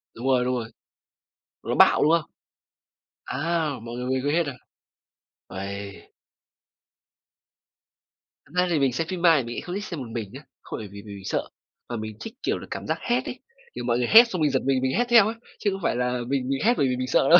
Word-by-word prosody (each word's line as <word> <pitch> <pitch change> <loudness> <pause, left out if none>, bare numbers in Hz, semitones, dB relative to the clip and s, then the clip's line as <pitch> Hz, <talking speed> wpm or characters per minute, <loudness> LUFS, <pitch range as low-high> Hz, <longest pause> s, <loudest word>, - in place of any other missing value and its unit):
Đúng 120 +4 -4
rồi, 125 -2 +4
đúng 125 0 0
rồi. 115 -2 -4 0.9
Nó - - -2
bạo, - - +6
đúng 155 - +5
không? 165 -2 +1 0.9
À, 165 -3 -1
mọi 115 0 -7
người 125 0 -4
về 130 - 0
quê 145 +2 0
hết 170 -1 +2
à? 140 - -3 1.0
Uầy! 100 +1 -7 2.3
Thật - - -22
ra 180 0 +3
thì 165 -4 +2
mình 135 -3 +2
xem 165 +4 -1
phim 185 -2 -4
ma 170 -2 +7
thì 130 - 0
mình 120 +1 -6
lại - - -3
không 180 - -6
thích 205 - -3
xem 170 -7 -5
một 120 -3 -6
mình 110 -4 -4
nhá, 140 +3 -9 0.2
không - - -6
phải 105 - -6
vì 100 0 -10
mình 100 -2 -9
sợ, - - -2 0.4
mà 120 - -3
mình 110 -1 -6
thích, 225 - -7
kiểu - - 0
là, - - -9
cảm - - -5
giác - - 0
hét 245 +1 0
ấy. - - -6 0.4
Kiểu, - - -4
mọi 120 -1 +2
người 120 -1 0
hét 230 +2 +9
xong 180 -6 -3
mình 150 -2 +3
giật 130 - +2
mình, 135 -1 +2
mình 130 0 +1
hét 245 - +3
theo 230 -4 +8
ấy, 225 - -3 0.2
chứ 205 - +1
không 195 0 -5
phải - - +1
là 125 0 0 0.2
mình 135 -2 -1
mình 135 0 0
hét 240 - +6
bởi 135 - +3
vì 125 - 0
mình 130 0 -2
sợ 135 - +3
đâu. 175 - +10
135 Hz, 240 wpm, -25 LUFS, 120-170 Hz, 2.3 s, đâu